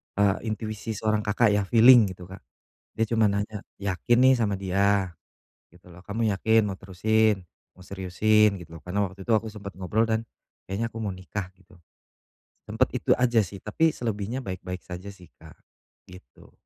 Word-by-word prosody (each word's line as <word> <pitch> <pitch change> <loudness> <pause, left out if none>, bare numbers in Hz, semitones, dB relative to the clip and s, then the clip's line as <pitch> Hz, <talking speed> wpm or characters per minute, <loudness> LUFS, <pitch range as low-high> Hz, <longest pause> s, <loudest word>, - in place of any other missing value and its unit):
eee, 100 -1 +3
intuisi 110 0 -4
seorang 110 0 -1
Kakak 105 +2 +3
ya 105 0 +2
feeling 115 +2 +7
gitu 90 0 -13
Kak, 95 - -10 0.6
dia 115 - +2
cuman 110 -1 +2 0.2
nanya, 105 -1 -8 0.2
"Yakin 100 +4 0
nih 130 0 +7
sama 100 -3 0
dia?" 100 0 +1 0.6
gitu 90 +1 -19
loh, 90 +1 -15
"Kamu 110 +2 -1
yakin 110 +3 +3
mau 95 - -4
terusin, 105 +2 +1 0.3
mau - - -20
seriusin?" 100 +3 +2
gitu 85 -1 -11
loh, 80 - -14
karena 90 +3 -2
waktu 95 +1 -12
itu 115 - 0
aku 110 +1 0
sempet 100 -2 -9
ngobrol 105 +5 +1
dan 110 0 0 0.5
kayaknya 100 +5 -2
aku 115 - -7
mau 105 -2 -2
nikah 95 +1 -6
gitu. 95 -1 -22 0.9
Sempat - - 0
itu - - +2
aja 120 -2 +2
sih, 95 +1 -10
tapi 160 +9 +1
selebihnya 115 +2 -3
baik-baik 90 -2 -6
saja 90 +2 -8
sih 90 -3 -17
Kak - - -15 0.5
gitu. 90 +1 -16
100 Hz, 175 wpm, -26 LUFS, 95-110 Hz, 0.9 s, feeling